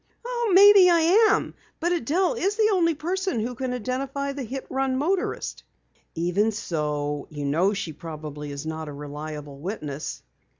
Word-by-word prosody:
"Maybe 390 0 +8
I 350 +6 +5
am, - - +1 0.3
but 345 +1 0
Adelle 350 - +1
is 410 -3 0
the 435 0 +3
only 335 -3 +2
person 365 0 -2
who 235 +3 -2
can 255 +1 -3
identify 270 +3 -3
the 280 - -5
hit 260 +2 -5
run 265 -1 -1
motorist." 355 +7 -1 0.5
"Even 180 +6 +1
so, 150 -7 -3
you 145 -2 -5
know 170 +8 +2
she 170 -5 -4
probably 150 -2 -7
is 140 +2 -6
not 160 -1 -4
a - - -7
reliable 145 0 -7
witness." 150 -5 -5
230 Hz, 155 wpm, -25 LUFS, -, 0.5 s, Maybe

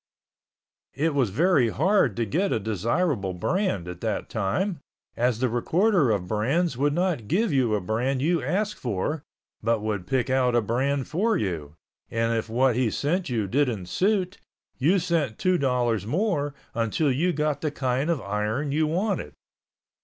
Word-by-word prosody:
It 155 +3 +1
was 135 -6 +2
very 140 - +3
hard 185 - +2
to 115 - +1
get 180 - 0
a - - +1
desirable 110 - -1
brand 100 - -1
at 90 -1 -7
that 110 -2 -3
time, 150 - -1 0.4
as 120 -1 +1
the 130 +2 +1
recorder 160 - +2
of 100 -5 0
brands 130 - 0
would 145 +3 +1
not 170 - 0
give 200 - +1
you 125 -5 +2
a 105 - -1
brand 120 +8 -1
you 165 +4 +1
asked 200 +10 -1
for, 125 +7 -2 0.4
but 115 0 +1
would 105 -4 -2
pick 125 +3 +1
out 130 -2 +2
a 120 - +4
brand 130 +5 0
for 215 +8 +1
you, 80 -7 -3 0.3
and 115 0 0
if 115 0 -2
what 125 +1 +2
he 125 -2 +2
sent 170 - -1
you 115 -4 0
didn't 120 -3 0
suit, 185 - 0 0.4
you 165 +9 +4
sent 160 - 0
two 185 -1 +2
dollars 120 -6 0
more 150 - 0 0.2
until 115 +6 +1
you 165 +8 +1
got 150 -3 -1
the 155 - 0
kind 135 +1 -1
of 165 -4 +1
iron 105 +8 -2
you 155 +2 +2
wanted. 180 - -1
130 Hz, 170 wpm, -25 LUFS, 110-165 Hz, 0.4 s, a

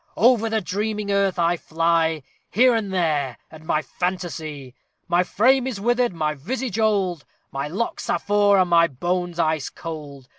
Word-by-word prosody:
Over 230 -1 +4
the 220 0 0
dreaming 210 +2 -2
earth 200 -2 +1
I 170 0 +2
fly, 165 -2 0 0.3
Here 250 +4 +4
and 220 -4 -1
there 150 -9 0
at 155 0 -13
my 155 0 0
fantasy! 155 -6 -4 0.3
My 175 0 +3
frame 255 +7 +3
is 240 -6 -4
withered, 240 +3 +1
my 155 -3 -1
visage 230 - -4
old, 195 -7 +1 0.3
My 140 +1 -3
locks 200 +10 -3
are - - +2
frore, 205 0 +3
and 180 -2 +2
my 170 0 +6
bones 175 +4 -2
ice 155 -3 0
cold. 145 -5 -8
175 Hz, 160 wpm, -23 LUFS, 155-210 Hz, 0.3 s, my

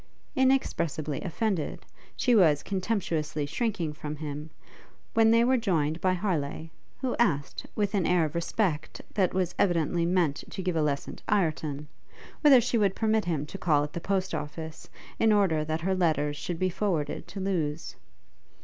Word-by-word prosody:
Inexpressibly 170 - +1
offended, 185 -1 -2 0.3
she 250 - +2
was 160 -9 +5
contemptuously 170 -7 -1
shrinking 170 - -2
from 150 0 -6
him, 150 0 -6 0.6
when 225 -1 +5
they 230 +1 +5
were 255 +2 +3
joined 165 -8 0
by 185 -1 +3
Harleigh, 165 -4 -2 0.3
who 260 -2 -1
asked, 155 -12 0
with 205 -1 0
an 195 -5 +1
air 175 -3 +3
of 155 - -5
respect 170 -1 -1
that 190 -4 +2
was 180 -2 -1
evidently 170 -2 +2
meant 175 -5 +2
to 190 - -5
give 180 -2 -1
a 160 - +2
lesson 145 -2 -2
to - - -17
Ireton, 155 -7 0 0.5
whether 285 -4 +8
she 235 0 +1
would 200 -2 +2
permit 220 -1 +1
him 160 -4 -1
to 195 +6 -8
call 150 -5 +3
at 150 - -5
the 170 - -4
post 190 0 -1
office, 160 +2 -6 0.3
to 225 - +4
order 190 -7 +3
that 155 +1 -2
her 190 +3 +1
letters 155 -5 +1
should 170 +3 -4
be 185 +1 0
forwarded 175 -6 -2
to 200 - -7
Lewes. 165 -5 -2
175 Hz, 165 wpm, -28 LUFS, 155-200 Hz, 0.6 s, whether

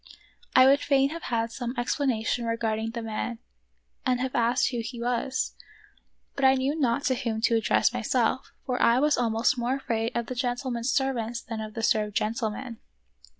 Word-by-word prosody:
I 255 - +8
would 275 +2 +6
fain 275 -1 +2
have 335 +1 -6
had 230 -1 0
some 245 +1 -4
explanation 240 -2 0
re 230 0 0
garding 220 0 -1
the 230 0 -5
man 225 +2 -3 0.7
and 250 -1 +1
have 260 0 -2
asked 235 +2 +2
who 240 - -2
he 235 +1 -5
was, 245 +2 -1 0.8
but 275 - -3
I 265 0 +6
knew 270 +3 0
not 270 -3 +1
to 260 - +2
whom 230 -2 -2
to 230 +1 +3
address 225 +1 +2
myself, 245 +1 0
for 250 -1 -1
I 235 +2 +5
was 295 +1 +3
almost 235 +2 +1
more 245 +2 0
afraid 230 -4 -2
of 235 - -1
the 255 - -5
gentlemen's 245 0 -2
servants 240 -4 0
than 225 -2 -5
of 215 -1 -7
the 225 - -4
served 210 -2 +1
gentlemen. 230 +2 -2
240 Hz, 185 wpm, -27 LUFS, 225-260 Hz, 0.8 s, I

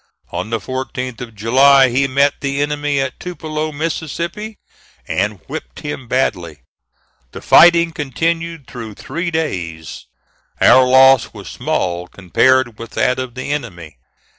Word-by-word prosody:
On 95 - -4
the 115 - 0
14th 130 +1 -5
of 115 -2 -8
July, 130 +5 +5
he 135 +3 +1
met 140 +2 +1
the 140 0 -2
enemy 145 -1 -1
at 135 -2 -3
Tupelo, 155 -3 -4
Mississippi, 170 +7 -4 0.5
and 105 +1 -1
whipped - - -8
him 145 -4 -6
badly. 90 - -2 0.7
The - - -8
fighting 170 0 +6
continued 165 +2 -3
through 115 -4 -9
three 170 - -4
days. 90 - -4 0.5
Our 130 0 +6
loss 130 0 +5
was - - -9
small 90 0 -2
compared 120 +6 +1
with 115 - -9
that 125 0 +1
of 130 -2 -5
the 130 +2 -5
enemy. 85 - -6
130 Hz, 135 wpm, -17 LUFS, 115-150 Hz, 0.7 s, fighting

